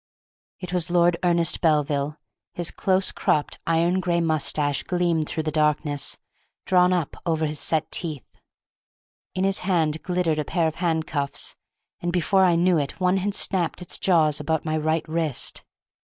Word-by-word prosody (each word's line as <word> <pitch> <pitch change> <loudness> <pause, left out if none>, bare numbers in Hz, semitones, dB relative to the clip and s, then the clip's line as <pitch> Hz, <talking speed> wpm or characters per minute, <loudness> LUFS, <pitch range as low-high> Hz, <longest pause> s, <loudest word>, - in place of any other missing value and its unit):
It 180 -2 -7
was 180 -1 0
Lord 175 0 +3
Ernest 170 -2 +2
Belville; 150 -2 +1 0.4
his 175 -2 -1
close 190 -1 +1
cropped, 150 - 0
iron 170 +3 +2
gray 175 -2 0
moustache 150 -3 0
gleamed 170 -4 0
through 160 - -2
the 155 - -2
darkness, 150 -1 0 0.5
drawn 180 -1 +4
up 175 -5 -1
over 160 -2 0
his 150 -1 -2
set 155 -1 0
teeth. 155 -8 -2 1.1
In 185 - 0
his 195 0 +2
hand 160 -5 0
glittered 175 -3 0
a - - 0
pair 170 +2 0
of 160 - -4
handcuffs, 160 -4 -1 0.5
and 175 - -2
before 185 +2 +2
I 175 -2 +3
knew 175 0 +3
it 140 -1 -4
one 185 +1 +2
had 200 +2 -2
snapped 180 -4 0
its 180 -2 -2
jaws 155 -5 +3
about 160 -1 -1
my 155 -1 -1
right 155 +1 -1
wrist. 155 -4 -2
165 Hz, 160 wpm, -24 LUFS, 155-180 Hz, 1.1 s, drawn